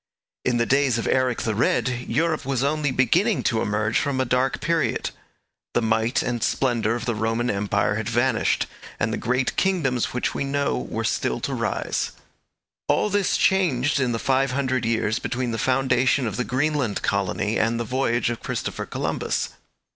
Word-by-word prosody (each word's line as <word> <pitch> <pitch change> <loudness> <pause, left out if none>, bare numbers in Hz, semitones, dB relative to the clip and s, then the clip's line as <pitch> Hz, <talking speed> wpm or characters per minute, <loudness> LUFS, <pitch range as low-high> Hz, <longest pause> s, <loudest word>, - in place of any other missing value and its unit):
In 125 -1 +1
the 120 - +2
days 135 -2 +2
of 115 - -2
Eric 130 -2 +1
the 110 - 0
Red 115 +2 +2 0.2
Europe 155 +5 0
was 135 -1 -1
only 150 +1 +1
beginning 175 - +2
to 110 -1 +1
emerge 110 +2 +1
from 140 -2 -1
a 130 - +2
dark 125 +2 +1
period. 165 +2 0 0.6
The 120 - +2
might 115 +4 +1
and 120 -1 -2
splendour 115 -3 +1
of 120 0 -4
the 120 - 0
Roman 115 +3 0
Empire 100 0 0
had 110 -1 -3
vanished, 120 0 +1 0.3
and - - 0
the - - -1
great 125 +2 0
kingdoms 155 - +1
which 125 - -2
we - - -2
know 140 - 0
were - - -2
still - - 0
to - - -2
rise. - - -2 0.7
All 210 - +2
this 205 -1 +2
changed 145 -8 +2
in 130 -3 +1
the 115 - -1
five 135 +2 +1
hundred 130 -2 0
years 115 0 0
between 125 -1 -2
the 115 - -3
foundation 130 0 +2
of 110 -4 -2
the 125 - -1
Greenland 135 -4 0
colony 100 +2 0
and 115 +1 +1
the - - 0
voyage 120 -1 0
of 120 - -5
Christopher - - -4
Columbus. - - -2
125 Hz, 175 wpm, -24 LUFS, 115-135 Hz, 0.7 s, the